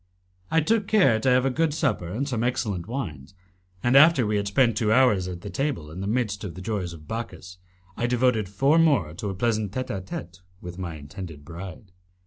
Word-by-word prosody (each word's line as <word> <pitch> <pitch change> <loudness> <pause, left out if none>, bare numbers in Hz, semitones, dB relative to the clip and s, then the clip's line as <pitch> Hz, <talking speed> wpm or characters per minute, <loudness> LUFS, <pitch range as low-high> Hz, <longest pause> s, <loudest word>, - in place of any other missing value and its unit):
I 160 - +3
took 210 +5 +1
care 180 - +4
to 130 - +1
have 125 +1 +4
a 135 - +2
good 155 +2 0
supper 125 - 0
and 115 +11 -3
some 120 -5 -1
excellent 105 -7 -1
wines, 95 - -5 0.5
and 120 +2 +3
after 150 -3 +7
we 105 0 +1
had 100 0 -1
spent 115 +2 +3
two 105 0 +1
hours 110 -7 +4
at 90 -2 -6
table 120 - -2
in 90 +4 -7
the 100 - -3
midst 105 -2 -1
of 90 -5 -6
the 95 - -8
joys 95 -3 -3
of 80 -2 -12
Bacchus, 90 -4 -6 0.4
I 120 - -1
devoted 120 -4 +1
four 135 +11 +3
more 130 - +3
to 100 +4 -4
a 95 - -4
pleasant 110 -1 0
tete 130 +1 -3
a 95 - -3
tete 85 -2 -8 0.2
with 90 +1 -9
my 85 -3 -4
intended 75 0 -9
bride. 90 +3 -9
105 Hz, 210 wpm, -25 LUFS, 90-130 Hz, 0.5 s, after